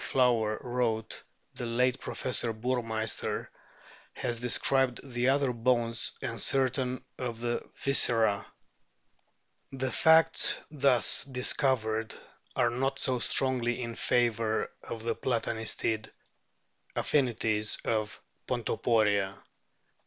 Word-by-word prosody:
Flower 115 Hz, -4 st, +2 dB
wrote, 120 Hz, -3 st, -2 dB, 0.3 s
the 120 Hz, -, -5 dB
late 125 Hz, +2 st, +1 dB
Professor 120 Hz, -2 st, -1 dB
Burmeisterf 115 Hz, -2 st, -2 dB, 0.6 s
has 120 Hz, -2 st, -3 dB
described 125 Hz, +1 st, +2 dB
the 125 Hz, -2 st, 0 dB
other 135 Hz, -2 st, +2 dB
bones 115 Hz, -1 st, 0 dB
and -, -, -3 dB
certain 130 Hz, -1 st, 0 dB, 0.2 s
of 120 Hz, -3 st, -4 dB
the 120 Hz, 0 st, -1 dB, 0.2 s
viscera. 115 Hz, -7 st, +3 dB, 1.3 s
The 130 Hz, -1 st, -3 dB
facts 160 Hz, +6 st, +4 dB
thus 140 Hz, -5 st, +3 dB
dis 125 Hz, -2 st, +1 dB
covered 110 Hz, -5 st, 0 dB, 0.4 s
are 120 Hz, -2 st, +2 dB
not 135 Hz, +3 st, -1 dB
so 130 Hz, -2 st, 0 dB
strongly 125 Hz, -1 st, +2 dB
in 115 Hz, -2 st, -4 dB
favour 115 Hz, -2 st, 0 dB
of 115 Hz, -1 st, -7 dB
the 115 Hz, 0 st, 0 dB
Plata 120 Hz, 0 st, -1 dB
nistid 110 Hz, 0 st, -2 dB, 0.9 s
affinities 115 Hz, -6 st, +1 dB
of 110 Hz, -2 st, -1 dB, 0.3 s
Pontoporia. 100 Hz, -4 st, +1 dB
120 Hz, 100 wpm, -29 LUFS, 115-130 Hz, 1.3 s, facts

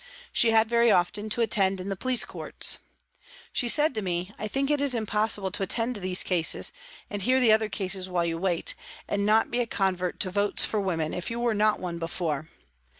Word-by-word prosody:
She 235 Hz, -, +4 dB
had 225 Hz, 0 st, +4 dB
very 235 Hz, 0 st, +3 dB
often 205 Hz, +3 st, +1 dB
to 235 Hz, -, 0 dB
attend 195 Hz, -4 st, +1 dB
in 185 Hz, +2 st, -5 dB
the 195 Hz, -, -2 dB
police 255 Hz, +5 st, +1 dB
courts. -, -, 0 dB, 0.7 s
She 245 Hz, -, +1 dB
said 295 Hz, +4 st, +3 dB
to 215 Hz, -, -3 dB
me: 180 Hz, +1 st, -3 dB
"I 215 Hz, -, -3 dB
think 275 Hz, +6 st, -1 dB
it 295 Hz, -1 st, +1 dB
is 280 Hz, -3 st, +3 dB
impossible 210 Hz, -3 st, 0 dB
to 185 Hz, -, -1 dB
attend 230 Hz, +5 st, -1 dB
these 185 Hz, -1 st, +2 dB
cases, 175 Hz, -3 st, +2 dB, 0.3 s
and 205 Hz, -1 st, -5 dB
hear 255 Hz, +6 st, +2 dB
the 240 Hz, -4 st, +4 dB
other 220 Hz, 0 st, +3 dB
cases 190 Hz, -1 st, -1 dB
while 175 Hz, -2 st, 0 dB
you 165 Hz, -1 st, -2 dB
wait, 175 Hz, -2 st, -1 dB, 0.3 s
and 200 Hz, 0 st, -1 dB
not 220 Hz, +1 st, +3 dB
be 240 Hz, -, -1 dB
a 240 Hz, -, 0 dB
convert 185 Hz, -4 st, -1 dB
to 185 Hz, -, 0 dB
votes 205 Hz, +1 st, +1 dB
for 215 Hz, -, -1 dB
women 165 Hz, -5 st, -2 dB
if 180 Hz, -, -4 dB
you 230 Hz, 0 st, -4 dB
were 235 Hz, -1 st, +1 dB
not 215 Hz, 0 st, +2 dB
one 175 Hz, -2 st, -5 dB
before. 165 Hz, -2 st, -3 dB
205 Hz, 210 wpm, -26 LUFS, 185-225 Hz, 0.7 s, She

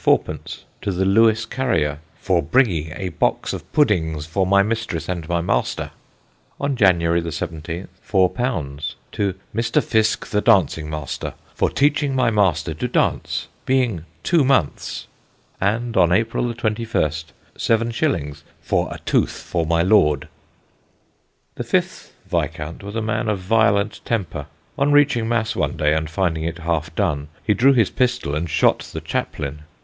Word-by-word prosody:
_ 75 Hz, 0 st, +1 dB, 0.2 s
to 100 Hz, -, -1 dB
the 95 Hz, +1 st, 0 dB
Lewes 110 Hz, +3 st, +4 dB
carrier 80 Hz, -, 0 dB, 0.2 s
"for 90 Hz, -3 st, +1 dB
bringing 85 Hz, -, +1 dB
a 95 Hz, -2 st, -3 dB
box 80 Hz, -, 0 dB
of -, -, -8 dB
puddings 80 Hz, -, +1 dB
for 95 Hz, +4 st, 0 dB
my 100 Hz, +1 st, +5 dB
mistress 105 Hz, -7 st, -2 dB
and 85 Hz, -3 st, -4 dB
my 85 Hz, -1 st, +1 dB
master"; 60 Hz, -8 st, -1 dB, 0.7 s
on 140 Hz, -1 st, 0 dB
January 85 Hz, -6 st, +3 dB
17th, 80 Hz, +1 st, -5 dB, 0.2 s
_£_4 90 Hz, -, 0 dB, 0.2 s
to 100 Hz, -2 st, -1 dB, 0.2 s
"Mr. 115 Hz, +1 st, +2 dB
Fiske 110 Hz, -1 st, +1 dB
the 105 Hz, -, 0 dB
dancing 85 Hz, -9 st, +3 dB
master 75 Hz, -3 st, -5 dB, 0.2 s
for -, -, +1 dB
teaching 145 Hz, -1 st, +1 dB
my 130 Hz, -3 st, +3 dB
master 90 Hz, -6 st, +1 dB
to 80 Hz, -, -3 dB
dance, -, -, 0 dB, 0.2 s
being 125 Hz, -10 st, +1 dB, 0.2 s
two 170 Hz, -4 st, +3 dB
months"; 130 Hz, -, 0 dB, 0.6 s
and 115 Hz, +4 st, 0 dB
on 85 Hz, -, +4 dB
April 115 Hz, +5 st, +1 dB
21st, 110 Hz, -9 st, -1 dB, 0.3 s
seven 115 Hz, +1 st, +1 dB
shillings 80 Hz, -, -1 dB, 0.2 s
"for -, -, -1 dB
a -, -, -5 dB
Tooth -, -, 0 dB
for 85 Hz, -3 st, -1 dB
my 85 Hz, 0 st, +2 dB
Lord." 75 Hz, -8 st, +3 dB, 1.3 s
The -, -, -5 dB
fifth -, -, -1 dB, 0.2 s
Viscount 75 Hz, +2 st, -3 dB
was 100 Hz, +2 st, -7 dB
a 115 Hz, -, -1 dB
man 110 Hz, 0 st, -1 dB
of 105 Hz, -, +1 dB
violent 100 Hz, +1 st, +1 dB
temper. 100 Hz, -8 st, -3 dB, 0.3 s
On 140 Hz, +1 st, +3 dB
reaching 140 Hz, -6 st, +3 dB
Mass 110 Hz, -2 st, 0 dB
one -, -, -1 dB
day 75 Hz, 0 st, +2 dB
and 80 Hz, 0 st, -1 dB
finding 80 Hz, -2 st, -1 dB
it 85 Hz, +1 st, -3 dB
half 85 Hz, -1 st, -2 dB
done, 70 Hz, 0 st, 0 dB, 0.2 s
he 105 Hz, -, +3 dB
drew 135 Hz, +6 st, +5 dB
his 115 Hz, -7 st, +3 dB
pistol 125 Hz, -, 0 dB
and 80 Hz, +3 st, -2 dB
shot 75 Hz, -, +3 dB
the -, -, -7 dB
chaplain. 75 Hz, +1 st, -3 dB
95 Hz, 150 wpm, -21 LUFS, 80-115 Hz, 1.3 s, my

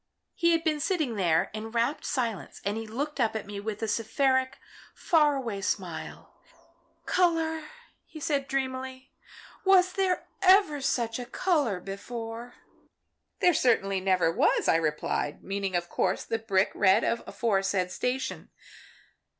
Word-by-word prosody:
"He 340 Hz, -, +2 dB
had 330 Hz, 0 st, +1 dB
been 310 Hz, -2 st, +1 dB
sitting 310 Hz, -, 0 dB
there 170 Hz, -6 st, +1 dB
in 220 Hz, +1 st, -5 dB
rapt 235 Hz, +6 st, -1 dB
silence 235 Hz, -8 st, -3 dB
and 200 Hz, +1 st, 0 dB
he 225 Hz, 0 st, -5 dB
looked 280 Hz, +6 st, -4 dB
up 225 Hz, -3 st, +1 dB
at 220 Hz, -, -3 dB
me 205 Hz, 0 st, -6 dB
with 215 Hz, +1 st, -5 dB
a -, -, 0 dB
seraphic, 260 Hz, +4 st, +1 dB, 0.4 s
far 300 Hz, -4 st, +3 dB
away 230 Hz, -7 st, -3 dB
smile. -, -, -5 dB, 0.6 s
'Colour,' 325 Hz, -3 st, +1 dB, 0.4 s
he 315 Hz, -, -10 dB
said, 285 Hz, -2 st, -1 dB
dreamily, 260 Hz, -1 st, -4 dB, 0.5 s
'was 370 Hz, -2 st, +5 dB
there 380 Hz, -2 st, 0 dB, 0.2 s
ever 370 Hz, -6 st, +5 dB
such 235 Hz, -3 st, -1 dB
a 245 Hz, -, -5 dB
colour 280 Hz, -, 0 dB
before?' 225 Hz, +5 st, -7 dB, 0.9 s
"'There 355 Hz, -, +5 dB
certainly 195 Hz, -8 st, +2 dB
never 185 Hz, -3 st, +2 dB
was,' -, -, +2 dB
I -, -, +5 dB
replied, 150 Hz, -2 st, -2 dB
meaning 195 Hz, -1 st, -3 dB
of 175 Hz, 0 st, 0 dB
course 185 Hz, +2 st, 0 dB
the 225 Hz, -, -2 dB
brick 200 Hz, -3 st, +1 dB
red 200 Hz, +3 st, +4 dB
of 235 Hz, -, +1 dB
the -, -, -12 dB
aforesaid 195 Hz, -5 st, 0 dB
station. 260 Hz, +5 st, -3 dB
235 Hz, 145 wpm, -28 LUFS, 200-295 Hz, 0.9 s, was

